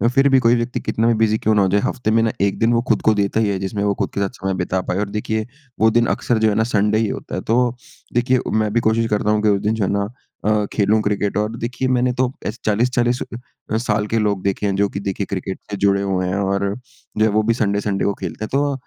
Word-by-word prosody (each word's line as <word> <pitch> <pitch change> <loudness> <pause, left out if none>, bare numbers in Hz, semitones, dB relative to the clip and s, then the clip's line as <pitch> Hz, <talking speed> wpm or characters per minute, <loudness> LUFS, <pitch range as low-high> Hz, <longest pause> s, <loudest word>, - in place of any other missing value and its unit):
फिर 135 +1 +5
भी 135 -1 +5
कोई 120 -1 +4
व्यक्ति 120 +1 -2
कितना 115 +1 0
भी 120 - +4
बिज़ी 110 -1 +2
क्यों 110 0 +1
ना 105 - +4
हो 95 - +3
जाए 100 +2 +2
हफ़्ते 115 -3 -1
में 115 +1 +4
ना 115 - +1
1 100 -1 +1
दिन 115 +1 +3
वो 115 - +3
खुद 110 - +2
को 110 - +4
देता 100 +1 0
ही 110 -2 +2
है 100 - 0
जिसमें 100 +2 -3
वो 100 0 +2
खुद - - 0
के 100 - -2
साथ 100 - 0
समय 95 0 -1
बिता 95 +1 -1
पाए। 90 - -3
और 105 -1 -2
देखिए 110 +1 -2 0.3
वो 110 - +5
दिन 120 +1 +3
अक्सर 120 - 0
जो 110 0 +3
है 105 - 0
ना 110 - +3
संडे 105 -2 +1
ही 110 0 +1
होता - - -5
है। - - -3
तो 120 +1 +1 0.4
देखिए 125 +2 +2
मैं 110 -1 +1
भी 120 - +3
कोशिश 115 +1 +2
करता 105 0 0
हूँ 105 0 +2
कि 105 - +4
उस 100 -1 +2
दिन 105 +1 +1
जो 110 - -1
है - - -1
ना 100 0 0 0.4
अ, 105 -1 +2
खेलूँ 105 +1 +3
क्रिकेट। 105 -1 -1
और 105 +2 -1
देखिए 125 +3 -2
मैंने 125 0 +2
तो 125 0 0
ऐसे 105 - -3
40-40 120 +3 +1 0.5
अ, 110 - +2
साल 105 -2 0
के 115 - 0
लोग 105 -3 0
देखे 100 +1 -1
हैं 100 -1 0
जो 100 +1 +2
कि 100 - -5
देखिए 100 0 -3
क्रिकेट 95 0 -4
से 100 - -2
जुड़े 100 0 +2
हुए 95 -2 -1
हैं, 90 - -1
और 100 0 0 0.4
जो 110 - +3
है - - +3
वो 110 +1 +2
भी 115 +2 +2
संडे 100 -3 0
संडे 100 -2 -1
को 100 - +1
खेलते 95 +2 -5
हैं। - - -10
तो 140 +1 +1
105 Hz, 285 wpm, -20 LUFS, 100-115 Hz, 0.5 s, फिर